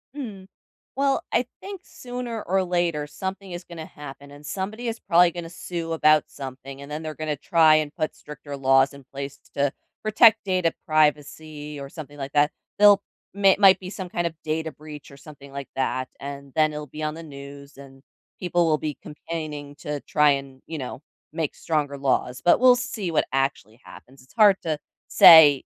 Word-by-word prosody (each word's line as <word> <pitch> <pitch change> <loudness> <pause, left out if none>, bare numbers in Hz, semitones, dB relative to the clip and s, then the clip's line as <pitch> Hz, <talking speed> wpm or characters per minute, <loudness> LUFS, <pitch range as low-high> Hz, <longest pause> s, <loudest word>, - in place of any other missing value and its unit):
Mm. 210 -9 -7 0.5
Well, 275 0 +1
I - - +2 0.2
think 390 -2 -8
sooner 245 -3 -6
or 190 +2 0
later, 175 -4 -1
something 190 +5 -6
is 175 +1 -7
gonna 170 -2 -9
happen, 140 -2 -11
and 145 +1 -13
somebody 210 +8 -4
is 225 0 -3
probably 175 -2 +4
gonna 170 -1 -7
sue 170 -1 -5
about 155 -2 +4
something 135 0 -9
and 140 +1 -11
then 150 +2 -5
they're 155 -1 -5
gonna 155 -1 -3
try 160 +2 +4
and 155 -1 -2
put 155 - -3
stricter 145 -1 -9
laws 135 0 +3
in 140 -1 -14
place 140 +1 -7
t - - -28
to 140 -1 +2 0.3
protect 220 0 +5
data 185 -4 +1
privacy 150 0 0
or 140 0 -7
something 145 -2 -10
like 135 0 -6
that. 145 +1 +3 0.3
They'll 205 -1 +7 0.3
may 195 -1 +4
might 195 -2 +7
be 185 -1 -8
some 190 -2 -6
kind 175 0 -2
of 165 - -4
data 160 0 -3
breach 150 0 -11
or 140 - -14
something 140 -1 -14
like 140 -1 -7
that, 130 -1 -1
and 140 -1 -8
then 155 -1 +3
it'll 150 0 -6
be 150 +3 -8
on 155 0 -2
the 165 - -9
news, 140 -1 -11
and 135 -1 -14 0.4
people 175 -1 +1
will 155 -1 +2
be 150 -1 -4
campaigning 150 -2 -7
to 150 -1 -5
try 150 +1 +3
and, 135 -1 -4
you 160 - -6
know, 130 +1 -7 0.3
make 160 -2 -3
stronger 145 -3 -2
laws, 125 -2 -1
but 175 - +5
we'll 250 -1 +7
see 245 -7 -4
what 160 - +1
actually 135 -4 -2
happens, 130 +1 -15
it's 130 - -22
hard 205 -3 +6
to 155 -2 -2 0.3
say, 150 -5 +8
155 Hz, 190 wpm, -24 LUFS, 140-175 Hz, 0.5 s, say